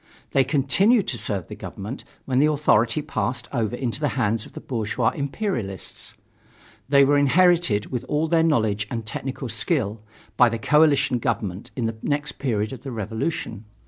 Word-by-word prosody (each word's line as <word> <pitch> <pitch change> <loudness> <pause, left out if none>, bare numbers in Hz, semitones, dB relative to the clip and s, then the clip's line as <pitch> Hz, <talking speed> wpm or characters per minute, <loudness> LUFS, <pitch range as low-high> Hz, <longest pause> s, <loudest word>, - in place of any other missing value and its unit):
They 135 - +4
continued 160 - +3
to 120 - -2
serve 95 -5 -1
the - - -8
government 105 +8 -7 0.2
when 130 -1 +1
the 150 - +5
authority 145 -2 +2
passed 130 -4 -2
over 115 -3 -1
into 120 0 -3
the 150 - +1
hands 110 -2 0
of - - -19
the - - -7
bourgeois 115 -4 -1
imperialists. 140 - -3 0.7
They 140 -1 +6
were 145 +1 +4
inherited 165 - +3
with 125 -3 -2
all 150 +2 0
their 165 0 +3
knowledge 110 -10 +1
and 115 -3 -4
technical 130 +3 -4
skill, 115 - -1 0.4
by 125 - +6
the 115 - -2
coalition 145 0 +3
government 100 -3 -3
in 120 - -2
the 115 0 -3
next 145 +1 -2
period 110 -4 -1
of 125 - -9
the 135 - -7
revolution. 110 - -4
130 Hz, 170 wpm, -23 LUFS, 110-145 Hz, 0.7 s, They